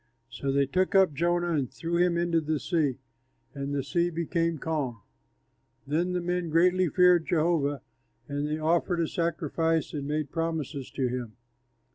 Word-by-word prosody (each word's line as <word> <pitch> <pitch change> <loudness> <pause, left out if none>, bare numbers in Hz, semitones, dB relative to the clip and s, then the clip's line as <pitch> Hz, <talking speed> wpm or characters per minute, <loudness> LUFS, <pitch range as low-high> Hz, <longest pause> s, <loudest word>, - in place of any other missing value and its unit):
So 135 +4 -2
they 140 0 +3
took 185 +8 0
up 190 -5 +5
Jonah, 175 +3 +1
and 140 -6 -1
threw 170 +1 -3
him 175 -1 +3
into 170 -1 +1
the 155 -1 -1
sea; 150 -7 0 0.6
and 140 0 -4
the 140 -1 -1
sea 170 +5 +1
became 170 0 -1
calm. 140 -7 -2 0.9
Then 165 +6 0
the 180 - 0
men 175 -1 -1
greatly 180 +2 +3
feared 180 -1 +4
Jehovah, 155 -4 +1 0.4
and 145 +1 -2
they 150 +1 -1
offered 170 +3 +1
a 165 - +1
sacrifice 165 -1 -1
and 140 -2 -4
made 150 -1 -2
promises 160 -5 -3
to 130 -2 -1
him. 120 -3 -4
160 Hz, 160 wpm, -28 LUFS, 145-175 Hz, 0.9 s, up